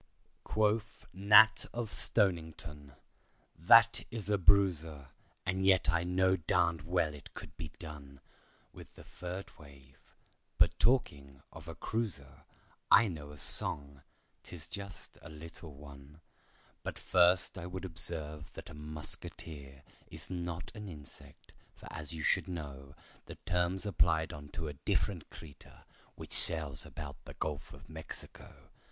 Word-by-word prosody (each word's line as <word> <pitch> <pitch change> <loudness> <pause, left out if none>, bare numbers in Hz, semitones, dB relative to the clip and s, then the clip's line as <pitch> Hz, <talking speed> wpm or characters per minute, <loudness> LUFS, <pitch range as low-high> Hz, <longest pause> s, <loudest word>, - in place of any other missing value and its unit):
Quoth 110 +1 0
Nat 105 +3 +6
of 120 -2 -3
Stonington, 80 - +1 0.6
"That 115 +7 +6
is 105 -3 -5
a 100 - +2
bruiser, 85 -7 +3 0.4
And 95 +1 -1
yet 95 -4 +4
I 85 0 +1
know 95 +1 +2
darn'd 85 -1 +1
well 85 -3 0
it 75 - -13
could - - -10
be 80 - -6
done 70 -4 -10 0.5
With - - -13
the - - -13
third 90 +2 -8
wave—but 70 -3 -4
talking 70 - +1
of - - -12
a - - -7
cruiser, 105 - -4 0.4
I 110 0 +7
know 75 -4 -7
a 75 - -11
song—'tis 70 +4 -3
just 100 -1 -9
a 85 - -11
little 80 0 -11
one— 70 +1 -13 0.6
But - - -5
first 90 +1 +3
I 85 -2 -6
would 95 +1 -6
observe 80 -3 -2
that - - -10
a - - -10
muskeeter 75 -2 -6 0.2
Is - - -7
not 85 -1 -4
an 105 -2 -7
insect, 75 -5 -14 0.2
for - - -13
as 75 0 -7
you 80 -2 -6
should - - +3
know 70 -5 -7 0.3
The - - -8
term's 90 +2 0
applied 80 -5 +1
unto 75 +2 -7
a 75 - -5
different 70 - -2
creeter, 70 -4 -14 0.3
Which - - -8
sails 80 -4 +5
about 70 -2 -9
the - - -11
Gulf 75 -3 -4
of - - -14
Mexico. 80 0 -11
80 Hz, 135 wpm, -33 LUFS, 75-95 Hz, 0.6 s, I